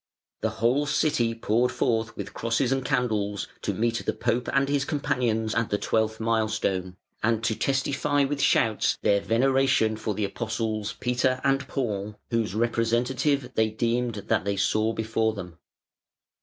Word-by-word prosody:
The 110 - +1
whole 130 +6 +2
city 140 -6 +1
poured 115 +2 +1
forth 115 -1 -1
with - - -6
crosses 115 +3 0
and 135 -1 +1
candles 105 -6 -1
to - - -1
meet 115 +1 -1
the - - -1
Pope 120 +1 -1
and 135 0 +2
his 140 0 +1
companions 125 -7 0
at 115 -1 0
the 105 - +1
twelfth 110 +1 0
milestone, 110 -5 -1 0.2
and 115 0 +1
to 110 0 +1
testify 140 +3 +1
with 140 +1 -1
shouts 110 -5 +2
their 100 -1 +3
veneration 130 -1 +2
for 105 -1 -3
the 105 - 0
Apostles 110 -1 -3
Peter 125 +1 +1
and 135 -1 +1
Paul, 105 -6 -3 0.2
whose 115 -4 0
representative 120 +4 +1
they 110 0 +2
deemed 115 +2 -1
that 110 -4 +2
they 100 0 -1
saw 110 +2 +2
before 110 0 0
them. 90 -4 -8
115 Hz, 155 wpm, -26 LUFS, 110-130 Hz, 0.2 s, their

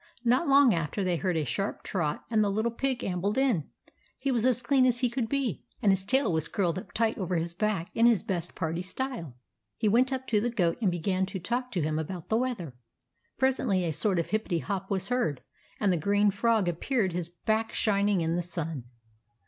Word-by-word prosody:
Not 250 +8 +3
long 275 -4 +6
after, 165 +4 -1
they 180 -2 +1
heard 180 -1 0
a 155 - 0
sharp 195 - -3
trot, 160 -6 -2
and 215 -2 +4
the 205 - +1
Little 220 +4 0
Pig 260 +2 -2
ambled 195 +4 -1
in. 245 - +1 0.5
He 275 0 -1
was 240 -1 +2
as 250 -1 +1
clean 260 +2 +3
as 245 -1 +1
could 235 -4 -1
be, 275 -4 -1 0.2
and 200 - +4
his 190 0 0
tail 260 -7 +2
was 160 0 0
curled 180 -3 0
up - - -12
tight 225 -1 0
over 185 -2 -1
his 170 +1 -1
back, 195 -2 -1
in 230 +1 +5
his 230 -6 +3
best 175 -3 -3
party 165 0 -2
style. 185 - -5 0.4
He 215 - +1
went 245 +5 +3
up 260 -1 -2
to 210 -2 +3
the 240 - 0
Goat, 185 -5 0
and 205 - +3
began 185 +2 0
to 195 - -5
talk 245 +7 -2
to 175 -5 0
him 155 +1 0
about 170 +1 -6
the 220 - +3
weather. 235 - -2 0.6
Pres 265 0 +2
ently 190 -7 +1
a 160 - -1
sort 195 +3 +1
of 170 - -1
hippety 215 -5 0
hop 195 -1 -3
was 195 0 -1
heard, 240 - 0 0.4
and 200 -3 +2
the 175 - +2
green 205 +5 +3
Frog 220 -1 +2
appeared, 190 +3 0
his 170 -1 -3
back 220 +6 -1
shining 200 -3 +2
in 165 0 0
the 175 - 0
sun. 165 -6 -4
200 Hz, 220 wpm, -28 LUFS, 175-235 Hz, 0.6 s, long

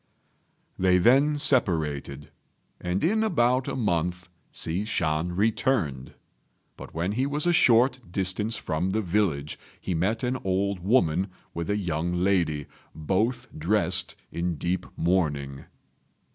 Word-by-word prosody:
They 90 0 +4
then 135 +9 +4
separated, 80 - +1 0.5
and 90 +2 -2
in 220 +6 +2
about 130 - +2
a - - -3
month 90 -6 -1 0.2
Hsi 85 +5 -1
Shan 85 -4 -1
returned; 100 - 0 0.6
but - - -11
when 85 +4 -1
he 130 +6 0
was 150 +2 -1
a 175 - +3
short 125 -2 +4
distance 95 +4 0
from 80 +4 -2
the 110 +3 -1
village 85 -7 -1 0.2
he 95 - -3
met 100 +8 0
an 125 +1 -1
old 95 +1 0
woman 95 -3 +2 0.3
with 85 0 -4
a 105 - +1
young 85 -3 -2
lady, 85 -5 +1 0.3
both 110 - -1
dressed 90 +1 +1 0.2
in 85 0 -2
deep 90 +4 -2
mourning. 75 -6 -1
95 Hz, 130 wpm, -26 LUFS, 85-115 Hz, 0.6 s, They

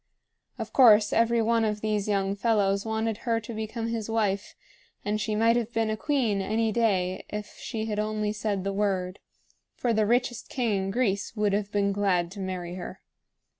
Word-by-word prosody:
Of - - -6
course 215 -5 +6
every 230 0 +3
one 230 0 +2
of 210 -1 -1
these 210 -2 -1
young 195 -1 0
fellows 200 -1 +1
wanted 220 0 -1
her 230 -1 0
to 230 +2 -7
become 220 +1 -4
his 225 -2 -3
wife; 205 -3 -1 0.5
and 210 +1 0
she 215 0 -1
might 230 +2 +4
have 240 -1 -1
been 225 -1 0
a - - 0
queen 230 -5 0
any 220 +3 0
day 190 -5 +1
if 210 0 -6
she 220 -1 -4
had 210 -1 -2
only 215 0 -1
said 210 -3 -2
the 195 0 -2
word, 195 -2 -1 0.6
for 240 -2 0
the 215 -1 +2
richest 240 0 0
king 215 -7 0
in - - -3
Greece 200 -2 -1
would 210 -2 +1
have 205 0 -1
been 200 -1 +1
glad 190 -4 +1
to 200 - -9
marry 185 -2 -4
her. 180 - -7
210 Hz, 190 wpm, -27 LUFS, 200-225 Hz, 0.6 s, course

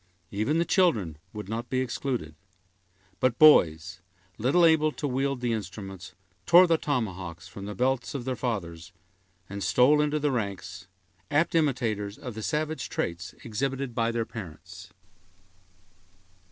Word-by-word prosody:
Even 110 +10 0
the 170 - +2
children 110 - +2
would 105 -3 -7
not 115 +3 -4
be 130 - 0
excluded; 125 - -3 0.9
but 125 -2 +1
boys, 85 - +5 0.4
little 140 +10 +4
able 155 -1 +4
to 150 - -4
wield 135 0 -1
the 120 -2 0
instruments, 95 -3 -7 0.3
tore 175 +2 +8
the 170 -2 +3
tomahawks 95 - -3
from 100 - -9
the 105 0 -6
belts 130 +2 0
of 125 -4 -4
their 130 -1 -1
fathers, 95 -9 -4 0.6
and 100 0 -5
stole 125 - +4
into 150 0 +1
the 145 -1 0
ranks, 95 -5 -4 0.4
apt 155 +3 +2
imitators 115 -10 0
of 125 - -7
the 110 - -6
savage 155 +5 -2
traits 85 +3 -4
exhibited 135 +3 -3
by 115 -1 +1
their 115 -1 -1
parents. 90 -4 -10
115 Hz, 140 wpm, -27 LUFS, 95-140 Hz, 0.9 s, tore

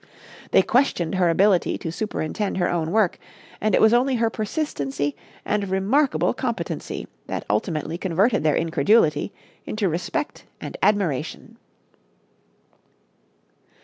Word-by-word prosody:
They - - +5
questioned 245 - +1
her 185 -2 +3
ability 190 +2 +3
to 165 - -5
superintend 205 0 -3
her 175 -1 +2
own 165 -2 -1
work, 205 -1 +2 0.4
and 215 0 +2
it - - +3
was 220 +1 +6
only 255 +2 +3
her 230 -1 +1
persistency 145 - -2 0.3
and 205 -2 -1
remarkable 210 +10 +2
competency - - -4 0.2
that - - -4
ultimately 165 -1 -2
converted 195 +5 +2
their 155 -1 +2
incredulity 160 +1 +2 0.3
into 215 -2 -1
respect 180 - -3
and - - -7
admiration. 195 -10 0
195 Hz, 115 wpm, -23 LUFS, 165-220 Hz, 0.4 s, was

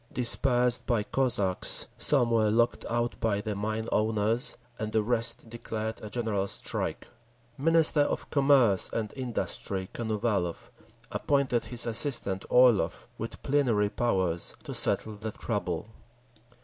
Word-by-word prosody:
Dispersed 125 0 +2
by 115 -4 +1
Cossacks, 105 -6 +1
some 125 -5 +3
were 110 -2 +3
locked 115 +2 +1
out 120 0 -2
by 110 -3 0
the 105 +1 -3
mine 110 +2 -3
owners, 110 +4 0 0.2
and 110 0 -3
the 110 -1 +1
rest 115 0 -1
declared 110 -1 -5
a 105 - -6
general 110 -4 -1
strike. - - -4 0.5
Minister 160 +2 +3
of 145 - 0
Commerce 135 -9 +4
and 110 -2 -3
Industry 105 -6 -3
Konovalov 105 -6 -2 0.4
appointed 140 -4 0
his 120 -1 0
assistant, 115 -5 +1
Orlov, 120 -9 +3
with - - -7
plenary 120 -8 +1
powers, 95 -7 -1
to - - -7
settle 110 -1 +1
the 110 0 -6
trouble. 105 -3 -3
115 Hz, 125 wpm, -28 LUFS, 105-125 Hz, 0.5 s, Commerce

